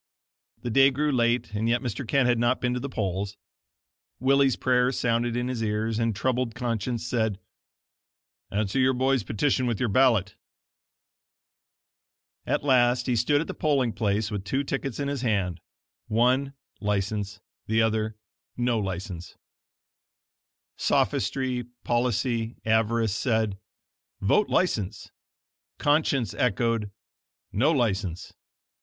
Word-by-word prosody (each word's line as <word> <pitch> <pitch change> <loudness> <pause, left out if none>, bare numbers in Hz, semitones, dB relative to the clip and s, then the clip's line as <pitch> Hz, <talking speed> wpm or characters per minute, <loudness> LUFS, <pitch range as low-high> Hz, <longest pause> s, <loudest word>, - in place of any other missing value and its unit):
The 120 - -2
day 135 +4 +6
grew 145 +3 0
late 120 -3 +1
and 110 +2 0
yet 120 +1 +1
Mr. 120 +1 -4
Kent 135 +1 +3
had 120 -2 +2
not 120 +2 +2
been 125 0 0
to 125 - -1
the 140 +3 -5
polls. 100 -2 -3 0.8
Willie's 135 0 +3
prayer 125 0 +2
sounded 120 -1 0
in 120 0 -1
his 125 -3 -3
ears, 110 +1 -1
and 115 -2 0
troubled 125 +2 -1
conscience 120 -1 -2
said: 110 -5 0 1.1
"Answer 105 +4 -1
your 130 0 +3
boy's 130 0 +2
petition 125 +6 0
with 115 -4 -1
your 125 - +1
ballot." 115 -4 +3 2.1
At - - 0
last 125 -3 +3
he 125 - +1
stood 145 +6 +2
at - - -3
the - - -5
polling 135 -7 +1
place 105 0 0
with 100 -2 -3
two 130 +8 -1
tickets 135 -2 -3
in 140 - -1
his 140 -3 -2
hand 95 -8 0 0.5
one, 125 +5 +2 0.3
license; 105 0 -2 0.3
the 110 +1 +3
other, 110 -1 -1 0.4
"No 120 -2 +1
License." 95 -2 -5 1.4
Sophistry, 125 +3 0 0.2
policy, 120 -1 0
avarice 110 -1 +2
said: 110 -5 0 0.6
"Vote 155 - +2
License." 105 - -1 0.7
Conscience 145 - +1
echoed: 115 -2 0 0.6
"No 135 +10 +3
License." 100 - -1
120 Hz, 125 wpm, -26 LUFS, 105-130 Hz, 2.1 s, day